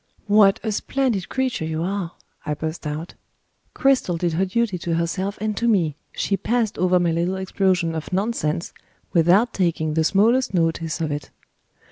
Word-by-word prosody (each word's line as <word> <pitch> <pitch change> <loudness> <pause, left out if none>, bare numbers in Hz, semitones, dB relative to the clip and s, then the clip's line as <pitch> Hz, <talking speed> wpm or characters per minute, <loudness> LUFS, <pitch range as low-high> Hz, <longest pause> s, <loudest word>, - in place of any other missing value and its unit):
"What 205 -1 +5
a 220 - -1
splendid 235 -2 -1
creature 260 -8 -1
you 160 0 -2
are!" 185 -2 -3 0.3
I 150 -1 -2
burst 155 +1 -5
out. 155 +3 -5 0.6
Cristel 260 -10 +2
did 170 -1 -1
her 185 +4 +1
duty 205 -1 -1
to 170 -1 -1
herself 185 +4 -2
and 215 0 -2
to 235 - 0
me; 175 -10 +2 0.2
she 200 - -1
passed 225 +2 -1
over 180 0 +3
my 175 -1 +1
little 170 +3 0
explosion 190 -3 0
of 160 +2 -5
nonsense 185 -5 -1 0.4
without 180 +8 +4
taking 165 -4 0
the 160 +1 +2
smallest 220 +6 +3
notice 165 -1 0
of 155 -2 -1
it. 145 0 -4
180 Hz, 165 wpm, -22 LUFS, 165-210 Hz, 0.6 s, What